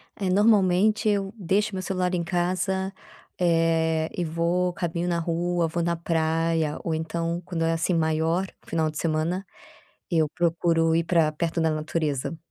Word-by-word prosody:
Eh, 190 -2 -2
normalmente, 205 +1 +3
eu 200 -1 0
deixo 200 +2 0
meu 185 - -2
celular 185 -1 -1
em 170 - -1
casa, 185 +2 -1 0.5
eh, 165 -2 +2
e 180 - 0
vou 170 +3 0
caminho 170 0 -2
na 170 -1 0
rua, 170 0 0
vou 170 +1 -2
na 170 0 0
praia 165 -1 0
ou, 165 - -1
então, 165 +2 -2
quando 170 -3 -2
é 165 0 +2
assim 165 +2 0
maior, 165 +3 +1 0.2
o - - -27
final 160 -1 0
de 155 - -8
semana, 165 +4 -1 0.7
eu 160 -3 +2
procuro 165 -1 +2
ir 165 - +1
pra 165 -2 +3
perto 165 +2 -2
da 160 0 +2
natureza. 155 -1 -2
170 Hz, 165 wpm, -25 LUFS, 160-180 Hz, 0.7 s, normalmente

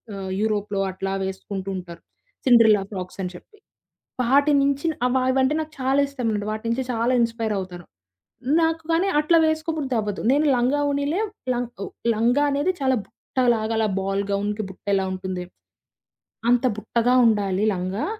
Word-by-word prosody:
ఆహ్, 190 -1 -5
యూరోప్‌లో 210 -2 -1
అట్లా 195 +1 -4
వేసుకుంటూంటారు. 190 -2 -5 0.4
సిండ్రెల్లా 225 -5 +6
ఫ్రాక్‌సని 185 -1 -5
చెప్పి. 420 - -15 0.7
వాటి 280 +4 +4
నించిన 280 +3 +1
అవవైంటే 260 +2 +2
నాకు 310 0 -6
చాలా 265 +2 +1
ఇష్టమండి, 230 -7 -2
వాటి 215 +1 -5
నుంచి 235 +3 0
చాలా 230 +2 +1
ఇన్‌స్పైర్ 230 -2 0
అవుతారు. 180 -2 -7 0.8
నాకు 325 0 +1
కానీ 360 +4 +2
అట్లా 330 +2 +4
వేసుకోబుద్ధి 315 -4 -1
అవ్వదు. 205 -2 -4
నేను 295 +2 +3
లంగా 260 +4 +1
వోనిలే 285 +6 0 0.3
లంగా 245 0 -3
ఓహ్ - - -8 0.2
లంగా 240 +6 +2
అనేది 290 +6 +1
చాలా 260 -1 +2
బుట్టలాగా 230 0 -1
అలా 220 -1 +2
బాల్ 195 +1 -1
గౌన్‌కి 205 +1 -1
బుట్టెలా 195 0 -1
ఉంటుంది? 185 -1 -4 1.1
అంత 245 +1 +3
బుట్టగా 235 +4 +1
ఉండాలి 205 -2 +1
లంగా. 185 +3 -3
230 Hz, 135 wpm, -23 LUFS, 195-275 Hz, 1.1 s, సిండ్రెల్లా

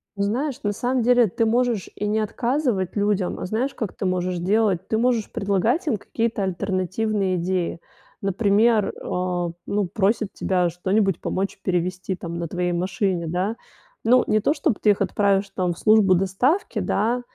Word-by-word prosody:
Ну 200 - -1
знаешь, 255 +7 -1
на 205 - +1
самом 250 +4 0
деле 245 -1 +5
ты 225 +4 0
можешь 235 -3 +1
и 210 - -3
не 215 +1 +1
отказывать 230 - -1
людям, 205 -3 0
а - - -4
знаешь, 230 +8 -1
как 220 -5 -4
ты - - -4
можешь 185 -1 -1
делать? 195 0 +1
Ты 220 - 0
можешь 235 -2 +1
предлагать 220 - 0
им 230 - +1
какие-то 225 +1 -2
альтернативные 190 +1 -1
идеи. 175 -1 -1 0.4
Например, 205 +2 +2
а, 180 -1 -2
ну 205 0 0
просит 205 +2 0
тебя 180 -2 +1
что-нибудь 190 +2 0
помочь 195 +1 -2
перевезти 185 +1 -1
там 170 -2 -7
на 170 - -3
твоей 180 +1 -1
машине, 180 0 -1
да. 185 +7 -1 0.5
Ну, 250 +2 +5
не 215 - +3
то, 250 - +2
чтобы 290 - 0
ты 210 - +5
их 200 - -1
отправишь, 200 -1 +1
там, 185 -2 -1
в - - -15
службу 215 -3 +5
доставки, 220 - 0
да, 230 +5 0
200 Hz, 170 wpm, -23 LUFS, 185-225 Hz, 0.5 s, деле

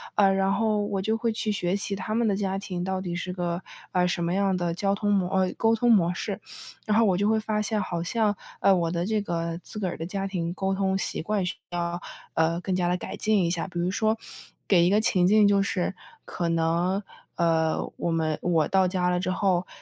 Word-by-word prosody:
呃， 195 -2 +5
然 195 0 +2
后 215 -2 +1
我 195 -2 -2
就 220 +3 0
会 230 -1 0
去 215 -1 -1
学 185 -2 0
习 200 0 -2
他 215 +3 -3
们 235 0 +2
的 200 - +2
家 195 -1 -1
庭 180 -3 -4
到 190 0 -2
底 175 -2 -4
是 180 +1 -4
个， 175 -1 -2 0.3
呃， 180 -1 +2
什 180 -1 -1
么 170 +1 0
样 195 -1 +2
的 175 -1 -1
交 195 +3 0
通 205 0 0
模 190 -3 +2
呃， 185 -1 +2
沟 225 0 +3
通 240 +1 +3
模 180 -5 +4
式， 195 +3 -4 0.5
然 215 0 +2
后 230 - +5
我 185 -3 +2
就 205 - +1
会 220 0 +3
发 215 -1 -1
现， 210 0 -1
好 170 -1 -3
像， 210 +1 +1 0.2
呃， 195 - +6
我 170 -2 0
的 170 0 -1
这 215 +1 0
个 170 -3 -3
自 180 - -11
个 190 - -1
儿 - - -6
的 165 - -4
家 195 +2 -3
庭 175 -3 -3
沟 190 +1 -1
通 190 0 +1
习 - - -2
惯 200 +2 -1
需 180 - -3 0.2
要， 175 - -3 0.6
呃， 165 +1 +1
更 185 0 -1
加 180 -1 +1
地 180 - +1
改 - - -6
进 215 -4 +2
一 170 - +1
下。 170 +1 -2
比 175 -2 -5
如 175 - +1
说 220 +2 +1 0.5
给 175 -4 +5
一 - - +4
个 205 +2 +4
情 185 -5 +3
境 210 +1 +6
就 200 -1 +4
是 190 -2 -1 0.3
可 170 -2 -3
能， 170 +4 +1 0.3
呃， 160 -1 +1
我 170 - -1
们 160 -2 0
我 165 -3 +2
到 190 -1 +3
家 180 -1 0
了 180 0 +1
之 185 - -2
后， 185 -2 +1
190 Hz, 260 characters per minute, -26 LUFS, 175-205 Hz, 0.6 s, 呃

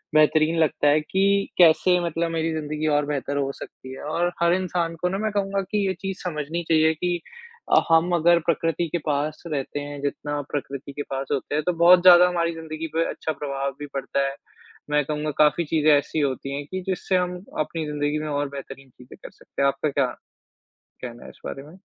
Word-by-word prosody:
बेहतरीन 155 +1 +4
लगता 155 -2 +2
है 150 +1 +4
कि 195 +4 +1
कैसे 180 +1 +5
मतलब 165 0 -1
मेरी 165 0 -1
ज़िंदगी 155 0 -3
और 145 -1 +2
बेहतर 145 -1 -2
हो 140 -1 0
सकती 130 0 -10
है। 135 - -9
और 170 +4 0
हर 170 0 +4
इंसान 175 -2 -1
को 180 - +1
ना 190 - -2
मैं 215 +1 -1
कहूँगा 200 -1 -1
कि 210 -1 +1
ये 190 - 0
चीज़ 195 -1 -4
समझनी 165 -1 -3
चाहिए 160 0 +4
कि 175 +2 -2 0.5
अ, - - +6
हम 165 +2 +4
अगर 170 +1 +4
प्रकृति 165 0 0
के 175 - -1
पास 150 +1 -1
रहते 145 -2 -3
हैं, 145 0 -7
जितना 145 +1 -3
प्रकृति 140 -1 -5
के 145 - -5
पास 135 0 -3
होते 145 0 -2
हैं, 155 - 0
तो 180 - +3
बहुत 175 +2 +7
ज़्यादा 180 0 +8
हमारी 170 -1 0
ज़िंदगी 160 0 -6
पे 165 0 +2
अच्छा 160 - -3
प्रभाव 140 -2 -3
भी 145 - -5
पड़ता 140 0 -1
है। 135 - -5 0.5
मैं 150 0 +2
कहूँगा, 150 +1 -2
काफ़ी 155 +3 +4
चीज़ें 155 0 +3
ऐसी 145 +2 -2
होती 140 -1 -2
हैं 145 0 -5
कि 185 0 -3
जिससे 190 0 -1
हम 180 0 -1 0.2
अपनी 155 +1 -2
ज़िंदगी 150 0 -1
में 155 - -4
और 145 -1 -1
बेहतरीन 135 -1 -9
चीज़ें 125 0 -15
कर - - -8
सकते - - -8
हैं। 140 - +5
आपका 140 +2 0
क्या 140 -1 +1 1.0
कहना 120 -1 -7
है - - -9
इस - - -17
बारे 135 - -6
में? 160 +6 -15
155 Hz, 210 wpm, -24 LUFS, 145-170 Hz, 1.0 s, ज़्यादा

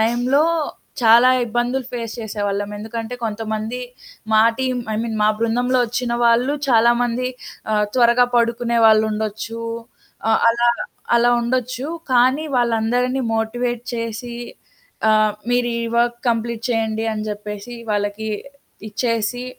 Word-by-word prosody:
టైంలో 245 +6 +2 0.6
చాలా 235 +3 +7 0.2
ఇబ్బందులు 240 +3 -1
ఫేస్ 230 -2 -4
చేసేవాళ్ళం. 205 -2 -3
ఎందుకంటే, 225 +2 -5
కొంతమంది 220 +2 -3 0.5
మా 215 - +6 0.2
టీమ్ 255 -1 -1
ఐ - - -1
మీన్, 225 -2 -3
మా - - +5
బృందంలో 245 +3 +1
ఒచ్చిన 245 +1 -2
వాళ్ళు 240 +4 +3
చాలామంది 240 +1 +3 0.4
ఆహ్, 210 0 +3
త్వరగా 245 0 +5
పడుకునే 235 0 +1
వాళ్లుండొచ్చు. 220 +1 +1 0.7
ఆహ్, - - +3
అలా, 235 +1 +2 0.5
అలా 240 +1 +4
ఉండొచ్చు. 255 +2 -2 0.3
కానీ, 260 +5 +3
వాళ్ళందరిని 245 +2 +1
మోటివేట్ 240 +2 -2
చేసి, 230 +1 -4 0.8
ఆహ్, 215 0 +4 0.2
మీరు 245 -1 +1
ఈ - - -2 0.2
వర్క్ 240 0 +1
కంప్లీట్ 230 0 -2
చేయండి 225 -1 -1
అని 215 0 -4
చెప్పేసి 210 +3 -7 0.2
వాళ్ళకి 205 +1 -2 0.6
ఇచ్చేసి, 230 +2 -1
235 Hz, 115 wpm, -20 LUFS, 220-245 Hz, 0.8 s, చాలా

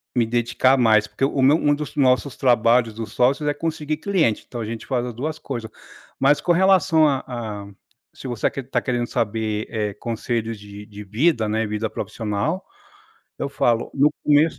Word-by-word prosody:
me 120 -2 +3
dedicar 120 +3 +2
mais, 110 -4 +4
porque 135 - -1
o 135 0 -1
meu 140 +4 +5
um 145 -2 +2
dos 150 0 -6
nossos 130 -1 +2
trabalhos 115 -2 +3
dos 110 -1 -6
sócios, 135 +6 +1
é - - +1
conseguir 155 -1 -3
cliente, 160 - 0
então 120 -2 -6
a - - -3
gente 115 +1 -6
faz 125 -2 -1
as 120 - -5
2 150 +7 -4
coisas. 120 -5 -6 0.5
Mas 140 +2 +4
com 175 - 0
relação 185 -3 +4
a 135 -2 0
a, 110 -5 -6 0.5
se - - -13
você 120 -4 0
quer 135 - -6
tá - - +1
querendo 120 -2 -1
saber, 110 -1 -2
eh, 105 -2 -2
conselhos 115 0 -3
de 105 0 -11
de 105 0 -10
vida, 110 - +1
né, 110 +1 0
vida 105 +1 -2
profissional, 115 - -3 0.8
eu 140 - -2
falo, 120 -4 0
no 145 +2 +3
começo 150 +2 +3
120 Hz, 185 wpm, -22 LUFS, 110-145 Hz, 0.8 s, meu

